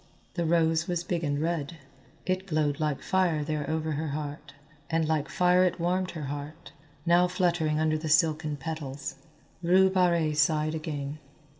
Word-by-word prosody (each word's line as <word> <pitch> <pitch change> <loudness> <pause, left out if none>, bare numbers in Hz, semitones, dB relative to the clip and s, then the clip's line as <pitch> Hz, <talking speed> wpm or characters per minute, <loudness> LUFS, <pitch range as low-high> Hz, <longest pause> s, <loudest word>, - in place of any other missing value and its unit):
The 170 -2 -1
rose 160 -1 +2
was 175 -2 -1
big 175 -1 -2
and 145 -1 0
red. 165 0 -2 0.5
It 185 +1 -1
glowed 155 -3 0
like 150 -3 -1
fire 180 -5 +1
there 150 -1 -3
over 160 0 -1
her 155 +2 -2
heart, 145 -1 -6 0.3
and 160 -1 +1
like 155 -1 0
fire 180 0 +4
it 180 -1 0
warmed 180 +2 0
her 155 - -5
heart, 145 +3 -7 0.3
now 175 +1 +5
fluttering 175 -4 +1
under 155 0 +1
the 155 0 -4
silken 155 -2 +2
petals. 140 -2 -5 0.4
Rue 185 +2 +4
Barrée 170 -5 +2
sighed 155 +1 +2
again. 150 -2 -4
160 Hz, 160 wpm, -28 LUFS, 150-175 Hz, 0.5 s, now